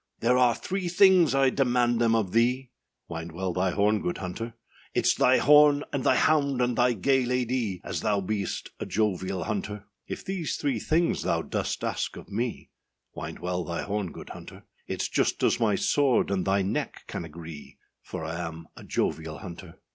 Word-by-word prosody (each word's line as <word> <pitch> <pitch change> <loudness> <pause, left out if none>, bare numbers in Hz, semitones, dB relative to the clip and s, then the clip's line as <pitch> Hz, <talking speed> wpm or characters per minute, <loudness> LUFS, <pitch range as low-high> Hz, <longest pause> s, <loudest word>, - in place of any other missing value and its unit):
âThere 125 +2 +3
are 125 -2 +4
three 190 -1 -3
things, 180 -4 +5
I 135 -1 +4
demand 120 -3 +2
them 115 -1 +4
of 105 -5 0
thee,â 125 +3 +2 0.4
Wind 80 0 -6
well 90 +1 -2
thy 90 +1 +1
horn, 105 +3 +2
good 90 - -2
hunter; 110 +6 -5 0.4
âItâs - - +3
thy - - +5
horn, 145 +1 +6
and 140 -3 -1
thy 130 - +4
hound, 140 -1 +2
and 125 -1 +1
thy 125 0 +3
gay 135 +5 +2
lady, 125 -6 -1
As 85 - -3
thou 105 -2 +1
beest 100 +1 -3
a - - -4
jovial 95 -3 -1
hunter.â 105 -1 -4 0.3
âIf - - -5
these 185 -5 -2
three 135 -6 -1
things 165 +8 +1
thou - - 0
dost - - -3
ask - - -2
of - - -12
me,â 115 +3 -3 0.4
Wind 80 +1 -6
well 90 0 -2
thy 85 0 -3
horn, 100 -3 -2
good - - -10
hunter; - - -10 0.3
âItâs - - -2
just - - +1
as - - +3
my 105 -3 +2
sword 135 -4 +2
and 95 -2 0
thy 95 0 +2
neck 95 - -3
can - - -5
agree, 80 -1 -10 0.2
For 80 - -6
I 80 +1 -4
am 80 0 -10
a - - -11
jovial 80 -1 -2
hunter. 85 -2 -10
110 Hz, 185 wpm, -27 LUFS, 90-130 Hz, 0.4 s, horn